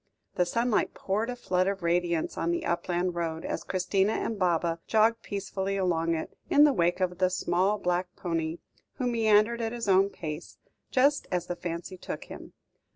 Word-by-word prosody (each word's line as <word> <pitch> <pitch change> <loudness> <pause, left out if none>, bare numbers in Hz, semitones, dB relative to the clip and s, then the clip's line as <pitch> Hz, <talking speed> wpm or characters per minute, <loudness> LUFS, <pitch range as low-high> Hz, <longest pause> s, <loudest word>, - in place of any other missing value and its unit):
The 180 - +1
sunlight 230 +4 +1
poured 210 +5 -1
a 250 - -3
flood 185 -6 0
of 195 -2 -2
radiance 170 -1 0
on 165 - -1
the 170 - -1
upland 175 +1 0
road, 165 -2 -3
as - - -3
Christina 190 +2 +1
and 220 -3 -2
Baba 170 -2 +1
jogged 225 +1 +3
peacefully 195 0 -3
along 170 -3 +1
it, 160 - -5
in 290 - +6
the 295 -2 +6
wake 175 -2 +1
of 180 -1 -1
the 185 -1 +3
small 185 +3 +1
black 180 -1 0
pony, 165 -2 -2 0.4
who 255 - -2
meandered 225 -1 +3
on 225 - 0
at 225 - -5
his 235 -3 -4
own 195 0 +5
pace, 155 -3 -7 0.3
just 280 +3 +3
as 180 -1 0
the 175 - -4
fancy 175 +2 -5
took - - -6
him. - - -11
185 Hz, 185 wpm, -28 LUFS, 175-215 Hz, 0.4 s, in